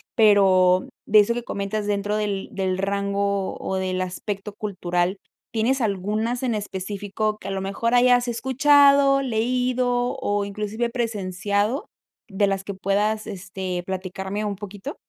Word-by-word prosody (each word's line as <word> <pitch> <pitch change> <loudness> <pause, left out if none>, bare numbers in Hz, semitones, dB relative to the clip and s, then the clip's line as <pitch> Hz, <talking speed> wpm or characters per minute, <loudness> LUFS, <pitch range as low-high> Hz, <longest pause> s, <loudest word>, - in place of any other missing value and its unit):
pero 190 -4 +5 0.2
de 215 0 +6
eso 210 +3 +3
que 240 0 -4
comentas 200 0 -3
dentro 205 +1 0
del 205 -2 -2
del 190 -1 -1
rango, 200 0 -1
o 190 - -3
del 185 -1 -1
aspecto 200 +2 -4
cultural, 185 -2 -1 0.4
¿tienes 245 +4 +1
algunas 215 +4 -1
en 240 -3 0
específico 205 +1 -3
que, 195 - -10
a - - -3
lo 195 - -2
mejor 200 +5 -1
hayas 245 0 +4
escuchado, 275 +3 +4
leído, 245 +1 0
o 205 0 0
inclusive 210 +3 -3
presenciado, 210 - -1 0.5
de 200 +1 +2
las 195 -1 -1
que 200 0 -6
puedas, 205 +3 0
este, 185 -2 -4
platicarme 190 +2 -4
un 205 - -2
poquito? 205 +7 -8
205 Hz, 140 wpm, -23 LUFS, 195-230 Hz, 0.5 s, de